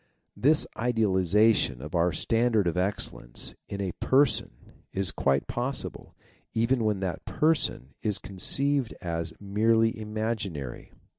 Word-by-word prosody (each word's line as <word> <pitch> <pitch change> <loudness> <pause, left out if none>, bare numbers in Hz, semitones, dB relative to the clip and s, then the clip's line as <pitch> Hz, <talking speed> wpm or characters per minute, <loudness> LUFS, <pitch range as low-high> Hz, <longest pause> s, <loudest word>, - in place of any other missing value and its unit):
This 150 +4 +4
idealiza 110 -2 +3
tion 65 -9 0
of 75 +4 -8
our 85 0 +2
standard 115 +4 +1
of 85 - 0
excellence 90 -10 -3
in 100 - -5
a 95 -2 -2
Person 140 +2 +1 0.2
is 95 -4 0
quite 70 0 +1
possible, 125 +3 -4 0.4
even 115 +2 +2
when 105 -3 0
that 95 -2 -3
Person 150 - +1
is 105 -2 0
conceived 135 +8 0
as 85 -2 -3
merely 115 +3 +2
imaginary. 105 - -4
105 Hz, 125 wpm, -27 LUFS, 90-115 Hz, 0.4 s, This